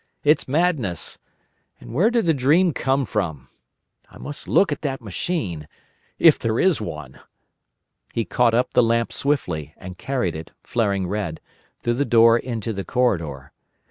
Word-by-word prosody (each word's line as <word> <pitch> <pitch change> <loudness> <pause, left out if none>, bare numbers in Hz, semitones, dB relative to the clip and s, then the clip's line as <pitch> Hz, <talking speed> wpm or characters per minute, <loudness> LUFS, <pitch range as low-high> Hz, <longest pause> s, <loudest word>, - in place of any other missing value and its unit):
It's 150 +2 +3
madness. 140 - 0 0.6
And - - -11
where 180 - +3
did 235 -3 +1
the 165 - +3
dream 155 +6 +3
come 135 0 0
from?… 80 - -3 0.6
I - - -15
must 145 - -7
look 195 - +3
at 145 - -3
that 135 -3 -3
machine. 100 - -3 0.5
If 165 -3 +6
there 115 0 -1
is 185 -10 +3
one!" 75 -10 -7 0.9
He 115 - -2
caught 120 -2 +2
up 125 - 0
the - - +5
lamp 115 0 +1
swiftly, 85 - -1
and 90 0 -10
carried 125 -12 -2
it, 80 0 -8
flaring 100 -5 0
red, 90 -4 -3 0.4
through 120 - +1
the 135 +4 0
door 115 -2 +5
into 115 -3 -4
the 100 -1 -4
corridor. 85 - -1
115 Hz, 155 wpm, -22 LUFS, 90-140 Hz, 0.9 s, If